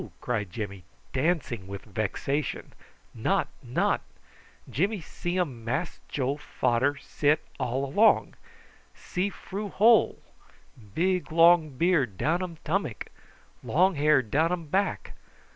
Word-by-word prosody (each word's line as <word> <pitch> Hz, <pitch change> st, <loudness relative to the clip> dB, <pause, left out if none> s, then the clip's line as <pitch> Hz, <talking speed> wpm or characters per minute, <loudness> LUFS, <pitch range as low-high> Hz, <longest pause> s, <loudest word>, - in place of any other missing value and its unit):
cried 105 Hz, -6 st, -2 dB
Jimmy, 100 Hz, -1 st, -6 dB, 0.3 s
dancing 130 Hz, -, -1 dB
with 100 Hz, 0 st, -7 dB
vexation. 115 Hz, +7 st, -3 dB, 0.4 s
"Not, -, -, 0 dB
not. -, -, 0 dB, 0.7 s
Jimmy 190 Hz, -, 0 dB
see 175 Hz, +2 st, -4 dB
um 130 Hz, -10 st, -2 dB
Mass 140 Hz, +9 st, -2 dB
Joe 140 Hz, +1 st, -1 dB
fader 130 Hz, -1 st, 0 dB
sit 150 Hz, +1 st, +1 dB, 0.2 s
all 130 Hz, +1 st, -1 dB
along. 205 Hz, +12 st, +3 dB, 0.6 s
See 185 Hz, +3 st, -2 dB
froo 200 Hz, +1 st, -6 dB
hole. 225 Hz, +4 st, +4 dB, 0.8 s
Big 180 Hz, 0 st, 0 dB
long 165 Hz, -4 st, +5 dB
beard 145 Hz, -, +2 dB
down 160 Hz, -, +1 dB
um 175 Hz, -3 st, -5 dB
tummuck 160 Hz, -, -2 dB, 0.5 s
long 185 Hz, +5 st, +3 dB
hair 150 Hz, -3 st, +3 dB
down 155 Hz, +9 st, +1 dB
um 175 Hz, -2 st, -2 dB
back. 190 Hz, +6 st, -1 dB
150 Hz, 115 wpm, -27 LUFS, 125-180 Hz, 0.8 s, long